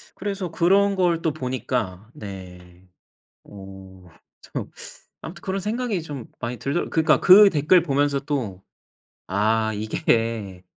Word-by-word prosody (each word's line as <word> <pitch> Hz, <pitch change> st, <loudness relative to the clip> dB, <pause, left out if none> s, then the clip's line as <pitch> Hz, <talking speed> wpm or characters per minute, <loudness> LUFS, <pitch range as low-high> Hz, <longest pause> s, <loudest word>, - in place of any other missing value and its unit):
그래서 195 Hz, -2 st, -4 dB
그런 195 Hz, +4 st, +3 dB
걸 175 Hz, -3 st, +1 dB
또 160 Hz, -, 0 dB
보니까 125 Hz, -7 st, -3 dB
네. 90 Hz, -2 st, -11 dB, 0.6 s
어. 95 Hz, -2 st, -13 dB, 0.4 s
참 -, -, -6 dB, 0.5 s
아무튼 175 Hz, +2 st, -9 dB
그런 195 Hz, +1 st, -3 dB
생각이 215 Hz, -2 st, -2 dB
좀 145 Hz, -7 st, -7 dB
많이 120 Hz, 0 st, -4 dB
들더 140 Hz, +7 st, -2 dB
그니까 160 Hz, -1 st, +3 dB
그 200 Hz, +2 st, +8 dB
댓글 160 Hz, +3 st, +4 dB
보면서 145 Hz, -2 st, +1 dB
또 130 Hz, -10 st, -4 dB, 0.7 s
"아 110 Hz, +3 st, +1 dB
이게" 110 Hz, -, -1 dB
135 Hz, 215 characters per minute, -23 LUFS, -, 0.7 s, 그